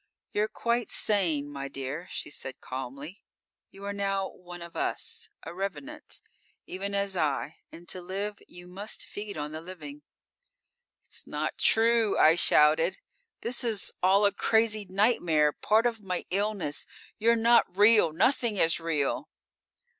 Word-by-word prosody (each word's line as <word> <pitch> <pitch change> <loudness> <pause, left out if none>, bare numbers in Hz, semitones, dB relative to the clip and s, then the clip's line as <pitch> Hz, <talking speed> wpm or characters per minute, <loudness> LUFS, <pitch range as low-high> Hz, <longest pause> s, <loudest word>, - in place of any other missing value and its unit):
_ - - -47
_"You're 210 +1 -4
quite 235 +1 -1
sane, 170 -9 +1
my 140 -1 -5
dear," 135 +5 -5
She - - -4
said 130 -2 -5
calmly. 135 +7 -7 0.5
"You 195 +1 -11
are 200 - -3
now 195 -1 -1
one 175 -1 -10
of 170 - -11
us; - - -3
a - - -7
revenant, 200 +11 -5 0.4
even 200 +2 -3
as 200 -1 0
I, 150 -2 -1
and 170 +1 -13
to 185 - -5
live 200 +3 -4
you 175 0 -12
must 195 +4 -4
feed 205 -2 -7
on 150 0 -4
the 155 +1 -6
living."_ 160 -5 -9 1.1
_"It's - - -11
not - - -3
true!" 225 -2 +4
I 155 - +7
shouted. 160 +1 +4 0.4
"This 240 +2 -3
is 220 -4 -2
all 195 +3 +5
a 200 - +5
crazy 215 0 +1
nightmare, 175 -7 +2
part 220 +2 +2
of 230 -3 0
my 185 -3 -3
illness! 200 -6 -1 0.3
You're 230 +2 +4
not 230 -4 +3
real! 210 -5 +6
Nothing 220 - +2
is 165 -2 +3
real!" 155 -4 -1
190 Hz, 150 wpm, -28 LUFS, 160-210 Hz, 1.1 s, I